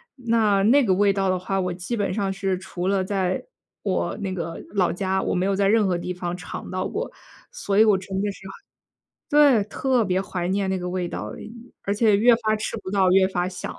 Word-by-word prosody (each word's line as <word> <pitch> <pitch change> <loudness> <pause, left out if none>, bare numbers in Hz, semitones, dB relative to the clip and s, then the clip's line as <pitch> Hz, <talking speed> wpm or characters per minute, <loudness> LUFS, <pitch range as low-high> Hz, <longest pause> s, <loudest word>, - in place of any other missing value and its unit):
那 225 -5 +2
那 265 +7 +5
个 195 -6 +2
味 200 +2 +3
道 195 -1 0
的 185 - +1
话， 190 +2 -2
我 180 -1 -1
基 180 +7 -4
本 205 -3 -1
上 200 -1 -1
是 195 -1 -1
除 180 0 -5
了 195 -1 +1
在 185 -1 -1 0.4
我 - - -1
那 190 -2 -3
个 165 -2 -4 0.2
老 185 -3 +2
家， 190 +1 -1
我 - - -1
没 180 +1 +1
有 200 - +1
在 200 -1 +2
任 215 +1 +4
何 180 -2 +1
地 180 +1 -4
方 175 -1 -4
尝 180 - -8
到 185 0 -2
过。 470 +4 -4 0.4
所 200 0 -2
以 215 - +8
我 210 -3 +4
真 190 +1 -7
的 205 0 -1
是 195 -1 -12
很 195 - -9 0.8
对， 285 -7 +5
特 255 +3 0
别 185 -1 0
怀 180 -2 -4
念 195 0 0
那 190 - 0
个 180 0 -4
味 180 -1 -2
道， - - -5 0.5
而 200 - 0
且 210 -1 +3
越 235 +3 +6
发 220 -2 0
吃 215 - -4
不 185 - -6
到 195 -2 +3
越 190 0 +5
发 180 -1 -1
想。 180 -1 -6
195 Hz, 250 characters per minute, -23 LUFS, 185-205 Hz, 0.8 s, 以